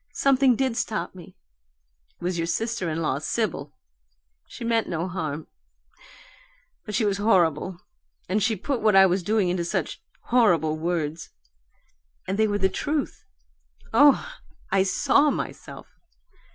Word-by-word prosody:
Something 270 -2 +3
did 260 -1 0
stop 220 -1 -3
me; 180 -2 -13 0.8
it - - -13
was 175 -1 -1
your 165 - -1
sister 225 0 -2
in 160 +1 -2
law, 140 -3 0
Sibyl. 155 -5 -2 0.8
She - - -9
meant 230 -1 0
no 170 +1 -2
harm 160 -4 -4 1.4
but 210 - -4
she 225 - +1
was 200 -1 0
horrible, 180 -4 +1 0.5
and 205 +4 0
she 220 +2 +1
put 250 +6 -3
what 215 -2 +3
I 195 0 +8
was 185 +1 +1
doing 205 0 +1
into 175 -1 -1
such 170 - -3 0.2
horrible 175 -11 +3
words 160 -1 -3 1.0
and 195 +3 -2
they 220 - +4
were 205 -1 0
the 190 -1 +2
truth 295 +7 -3 0.7
oh! 285 - +5 0.4
I 195 0 +3
SAW 195 +10 +3
myself! - - -6
190 Hz, 140 wpm, -25 LUFS, 170-225 Hz, 1.4 s, I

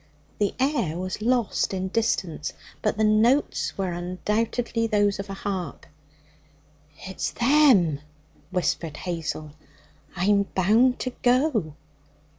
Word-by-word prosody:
The 205 -2 0
air 260 - 0
was 185 +3 -4
lost 235 -4 +1
in 190 0 -2
distance, 185 -8 -1 0.3
but - - 0
the 220 - +1
notes 220 +6 +2
were 190 -2 -1
undoubtedly 215 +6 -1
those 205 -2 +1
of 195 0 -6
a 195 - -5
harp. 185 -7 -4 1.2
'It's 190 0 -3
them!' 240 - +4 0.5
whispered 175 -4 -1
Hazel. 165 -3 -4 0.6
'I'm 200 +2 +2
bound 225 +7 +4
to 255 - -2
go.' 245 - +2
200 Hz, 110 wpm, -25 LUFS, 180-230 Hz, 1.2 s, them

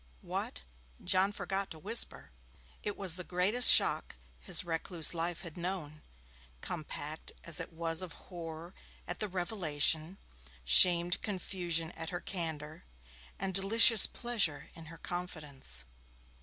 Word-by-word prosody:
'What!' - - -6 0.4
John 190 +2 +2
forgot 195 -1 -4
to 160 - -10
whisper. 220 +9 0 0.5
It 205 - -6
was 185 -4 0
the 180 - -6
greatest 190 +8 +3
shock - - +4 0.2
his 65 - +1
recluse 165 0 +5
life 170 0 -3
had 170 -4 -9
known, 170 -4 -6 0.6
compact 155 - -7
as 170 -3 +2
it - - -7
was 165 0 +2
of 185 -3 -7
horror 170 -1 -10 0.3
at - - -5
the 215 - -2
revelation, 175 -3 -1 0.5
shamed 175 - +5
confusion 175 -4 -3
at 165 0 -7
her 175 - -5
candour, 160 -5 -4 0.5
and 190 0 -4
delicious 215 +3 +5
pleasure 195 -12 -2
in 165 - -13
her 165 +1 -12
confidence. 150 - -5
175 Hz, 130 wpm, -31 LUFS, 160-190 Hz, 0.6 s, recluse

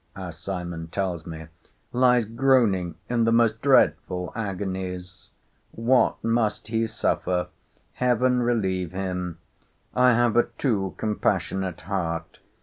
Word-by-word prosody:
as 90 -4 -7
Simon 85 -3 -5
tells 90 -2 -3
me, 80 -1 -7 0.5
lies 125 -2 +4
groaning 115 -8 +2
in 120 -1 +1
the 115 - +3
most 115 -1 +3
dreadful 90 -9 +2
agonies!—What 95 +4 -2
must 115 -2 0
he 115 0 +1
suffer!—Heaven 125 +7 -1
relieve 95 -7 0
him!—I 90 +6 -2
have 120 -1 +2
a 120 - +4
too 100 -9 0
compassionate 95 -4 -1
heart. 85 -3 -3
100 Hz, 100 wpm, -25 LUFS, 90-120 Hz, 0.5 s, lies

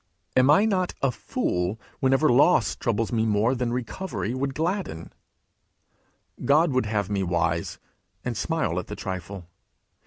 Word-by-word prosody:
Am 130 +1 +5
I 175 +9 +6
not 185 -4 0
a 135 - +3
fool 90 -2 -2 0.2
whenever 135 +3 +3
loss 140 +8 +4
troubles 115 -1 -1
me 115 -2 +1
more 110 +3 +2
than 125 -2 -1
recovery 125 - -3
would 135 +1 -2
gladden? 165 - -3 1.3
God 155 +3 +4
would 130 -4 +1
have 105 -2 -1
me 100 -1 0
wise, 85 -2 -1 0.5
and 125 -1 -2
smile 130 - -1
at - - -7
the 105 - -6
trifle. 95 -1 -6
120 Hz, 145 wpm, -25 LUFS, 100-140 Hz, 1.3 s, I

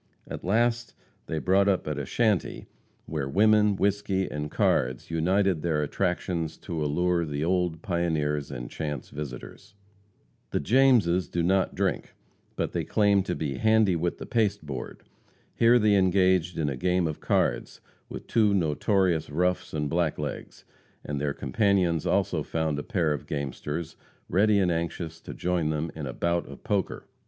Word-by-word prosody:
At - - -7
last 120 +4 +1 0.3
they 80 - -3
brought 95 +5 +3
up 95 -5 +1
at 75 -2 -2
a 70 - -5
shanty 110 -6 0 0.4
where 75 -4 -3
women, 105 +3 +4
whisky 100 -1 0
and 75 0 -4
cards 65 +1 0
united 90 +1 +1
their 80 -3 0
attractions 85 -1 -2
to 80 -4 -3
allure 85 +4 +1
the 75 -1 -3
old 90 -3 0
pioneers 80 -6 -1
and - - -6
chance 75 -4 -5
visitors. 75 - -8 0.7
The - - -1
Jameses 110 - +3
do 85 - -1
not 95 +2 +1
drink, - - -2 0.4
but - - -2
they - - -2
claim 100 -2 +3
to 90 -1 -3
be 70 -4 -3
"handy 110 -4 +3
with 85 +1 -1
the - - -7
pasteboard." 100 - -2 0.5
Here 115 +1 +5
they 105 -3 +3
engaged 95 -2 +3
in 80 - 0
a 70 - -2
game 90 +5 +1
of 80 -2 -3
cards - - 0 0.3
with - - -8
two 105 -3 +2
notorious 85 0 +1
roughs 90 +5 0
and 75 -1 -2
blacklegs; 75 -2 -3 0.4
and 75 -1 -3
their 75 -1 -1
companions 90 - +1
also - - +1
found 80 -3 -2
a - - -4
pair 85 -9 0
of 75 - -6
gamesters, 75 +3 -4 0.3
ready 105 +3 +3
and 95 -3 +2
anxious 80 0 -4
to - - -9
join 90 -3 0
them 80 +1 -2
in 75 -3 -6
a 65 - -5
"bout 85 0 0
of - - -12
poker." 100 -2 -2
85 Hz, 160 wpm, -27 LUFS, 75-100 Hz, 0.7 s, Here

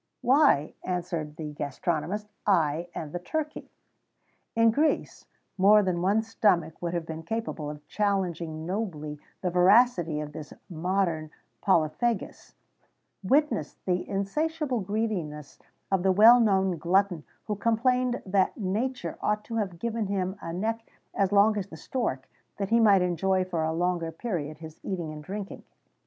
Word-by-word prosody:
"Why," 255 - +4
answered 170 -4 -3
the 150 -2 -6
gastronomist, 165 +8 -2 0.2
"I 165 -3 +2
and 150 -2 -5
the 175 - -2
turkey." 305 - -4 0.9
In 230 0 +5
Greece, 300 +7 0 0.3
more 205 +2 +6
than 180 -2 -1
one 205 +4 +2
stomach 180 -8 +1
would 175 0 -2
have 170 -1 -2
been 160 0 -6
capable 220 -6 -4
of 150 0 -9
challenging 175 -6 -1
nobly 165 -7 -4 0.2
the 180 - -1
voracity 180 -3 +4
of 150 -1 -6
this 150 0 -8 0.2
modern 170 -2 -1 0.3
polyphagus: 190 +6 0 0.7
witness 265 - +1
the 180 -1 -1
insatiable 285 +7 -1
greediness 185 -8 -3 0.3
of 190 -2 +2
the 190 +1 +3
well 225 +6 +8
known 190 -6 +2
glutton 180 -1 +1 0.2
who 210 - -2
complained 245 +3 +1
that 190 0 +1
nature 225 +6 -2
ought 210 0 0
to 230 0 -5
have 195 -6 -2
given 225 +2 -2
him 190 -1 -1
a 165 - -5
neck 220 +6 -1 0.3
as 195 -1 +1
long 205 +2 +5
as 195 - -5
the 160 - -11
stork, 155 - -3 0.3
that 195 -1 -2
he 230 +1 +4
might 200 -5 +5
enjoy 185 +2 +1
for 175 -3 -2
a 160 - 0
longer 170 0 -1
period 160 -6 -4
his 160 0 -11
eating 170 -5 -4
and 150 0 -9
drinking. 200 +3 -6
190 Hz, 145 wpm, -27 LUFS, 165-215 Hz, 0.9 s, well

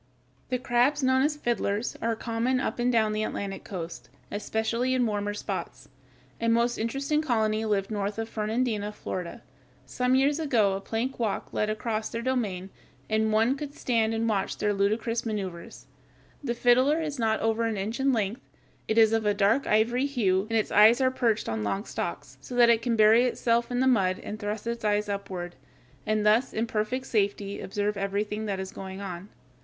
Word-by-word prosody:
The 250 - +1
crabs 255 +3 +2
known 260 0 +3
as 295 +2 +1
fiddlers 230 -4 -1
(Fig. - - -16
149) 230 - 0
are 230 - +1
common 235 +3 -1
up 250 - -2
and 245 +1 +2
down 220 -3 +2
the 215 - -1
Atlantic 200 -2 -4
coast, 165 -11 -7 0.2
especially 220 +4 -1
in 250 -1 +2
the - - +1
warmer 205 0 -2
portions. - - -5 0.5
A 230 - +2
most 235 +1 +2
interesting 275 +7 0
colony 220 -6 0
lived 200 -1 0
north 205 0 -2
of 225 0 -3
Fernandina, 215 -1 -1
Florida. 180 -4 -6 0.4
Some 250 - +1
years 280 +3 +3
ago 230 -10 +2
a 195 - -3
plank 230 +6 -3
walk 220 -4 -2
led 210 - 0
across 215 0 -2
their 230 0 -4
domain, 205 -8 -2 0.4
and 220 0 +2
one 225 +5 +3
could 285 0 -7
stand 225 -2 +1
and 225 +1 0
watch 200 -3 -1
their 210 0 +1
ludicrous 220 +4 0
maneuvers. 195 -6 -5 0.6
The 240 -4 -1
fiddler 255 +6 +4
is 300 -4 -4
not 220 -1 +1
over 225 +1 +1
an 225 -2 -1
inch 215 +6 -3
in 270 +1 +3
length. 220 0 -1 0.5
It 220 - 0
is 220 -1 +6
of 225 -1 +1
a 205 - +2
dark 215 +7 +2
ivory 240 +5 +2
hue, 200 -8 +1
and 225 - +1
its 215 - 0
eyes 220 +4 +7
are 260 -1 +3
perched 230 -4 0
on 110 -1 -2
long 195 - -2
stalks, - - -5
so 250 - -8
that 240 -1 +6
it 230 -1 +3
can 235 0 0
bury 220 +3 +6
itself 235 -1 +1
in 245 0 0
the - - +3
mud 190 -7 +3
and 215 - -7
thrust 210 0 -4
its 235 0 -3
eyes 210 0 +1
upward, 190 -3 -5 0.5
and 215 -1 +1
thus 220 +5 +3
in 225 - 0
perfect 230 +4 -2
safety 200 -3 -1
observe 205 +1 -2
everything 205 +2 -2
that 195 -2 -2
is 190 0 -5
going 190 0 -7
on. 190 0 -7
220 Hz, 195 wpm, -27 LUFS, 205-240 Hz, 0.6 s, eyes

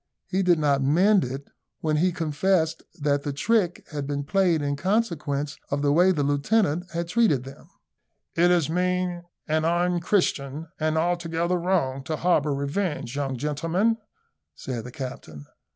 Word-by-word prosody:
He 190 0 -1
did 180 -2 +4
not 145 -3 +2
mend 180 +9 +4
it 135 +3 -5 0.3
when 155 -1 +1
he 180 +4 +3
confessed 165 0 0 0.2
that 145 -1 +1
the 145 - -3
trick 180 +4 0
had 145 -2 -4
been 145 0 -2
played 170 -1 +2
in 145 0 0
consequence 150 -6 -1
of 140 +1 -1
the 145 0 +3
way 180 +4 +5
the 150 -6 0
lieutenant 155 +4 +1
had 170 0 -3
treated 175 - +2
him. 135 +1 -12 0.7
"It 175 +2 +4
is 175 -4 +3
mean, 180 +1 -1 0.2
and 155 0 +1
unchristian, 170 -3 0
and 155 0 0
altogether 170 +1 0
wrong, 170 -7 0
to 155 - -2
harbour 155 -4 +2
revenge, 140 -2 -2
young 135 -2 -2
gentlemen," 165 - 0 0.6
said 125 -3 -5
the 125 - -8
captain. 125 - -7
160 Hz, 150 wpm, -25 LUFS, 140-180 Hz, 0.7 s, way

